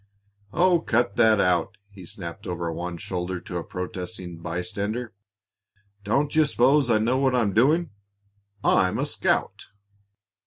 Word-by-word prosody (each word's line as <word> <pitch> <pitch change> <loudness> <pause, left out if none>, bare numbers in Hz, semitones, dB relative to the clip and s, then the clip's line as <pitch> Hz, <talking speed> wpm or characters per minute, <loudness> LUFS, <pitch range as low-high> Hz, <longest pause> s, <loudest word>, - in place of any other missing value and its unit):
"Oh, 175 +3 +3
cut 120 -5 0
that 110 -3 +5
out!" 90 -3 +1
he 95 -3 -12
snapped 95 +3 -8
over 85 -1 -3
one 85 +1 -5
shoulder 90 +1 -4
to 90 - -6
a 85 - -3
protesting 90 -1 -6
bystander. 100 +7 -4 0.9
"Don't 140 +9 0
you 155 -1 +5
s'pose 135 +1 +3
I 115 - +4
know 120 +4 +1
what 130 -2 +2
I'm 110 -5 +1
doing? 150 - +3 0.7
I'm 95 -1 +3
a - - 0
scout!" - - -1
105 Hz, 140 wpm, -25 LUFS, 90-125 Hz, 0.9 s, that